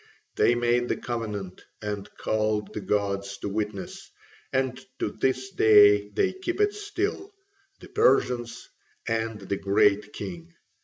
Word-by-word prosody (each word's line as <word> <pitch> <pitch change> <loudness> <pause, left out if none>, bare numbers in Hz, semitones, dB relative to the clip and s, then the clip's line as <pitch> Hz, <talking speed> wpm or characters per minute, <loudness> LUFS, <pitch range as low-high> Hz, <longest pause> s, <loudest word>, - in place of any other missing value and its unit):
They 120 - +4
made 120 0 +1
the - - 0
covenant 105 -6 -5 0.2
and 105 -1 -5
called 110 -1 -1
the 105 - -4
gods 100 0 -1
to 100 - -5
witness, 105 -1 -4 0.4
and 130 -1 -1
to 105 - -2
this 130 +3 -1
day 105 -1 +6
they 100 - +1
keep 370 -1 -4
it 415 0 +3
still, 410 -1 -3 0.5
the - - -11
Persians 125 - +1 0.4
and 115 -1 -1
the 100 0 -3
Great 100 +1 +2
King. 170 +3 -8
110 Hz, 135 wpm, -26 LUFS, 105-130 Hz, 0.5 s, day